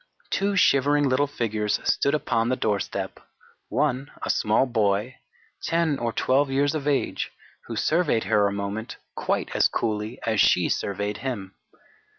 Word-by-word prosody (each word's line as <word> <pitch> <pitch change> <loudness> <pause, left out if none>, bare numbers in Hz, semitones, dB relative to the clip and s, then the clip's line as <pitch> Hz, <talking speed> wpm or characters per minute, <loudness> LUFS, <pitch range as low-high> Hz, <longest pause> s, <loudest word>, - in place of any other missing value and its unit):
Two 200 +1 +1
shivering 145 -4 +4
little 135 +2 +2
figures 110 -6 -1
stood 140 +2 +2
upon 115 -5 0
the 130 - +2
doorstep, 105 -5 -2 0.5
one 135 +2 0
a - - +1
small 110 +5 +2
boy, 110 0 0 0.5
10 165 -4 +1
or 120 -1 -1
12 135 +4 +2
years 140 +2 +1
of 150 -2 -3
age, 145 -2 0 0.4
who - - -5
surveyed 155 -9 +1
her 105 -1 +3
a - - -1
moment 100 +3 -4 0.2
quite - - -1
as - - +5
coolly 110 +2 -2
as 110 -2 +1
she - - +4
surveyed 100 +1 -2
him. 105 -8 -5
125 Hz, 150 wpm, -25 LUFS, 105-145 Hz, 0.5 s, as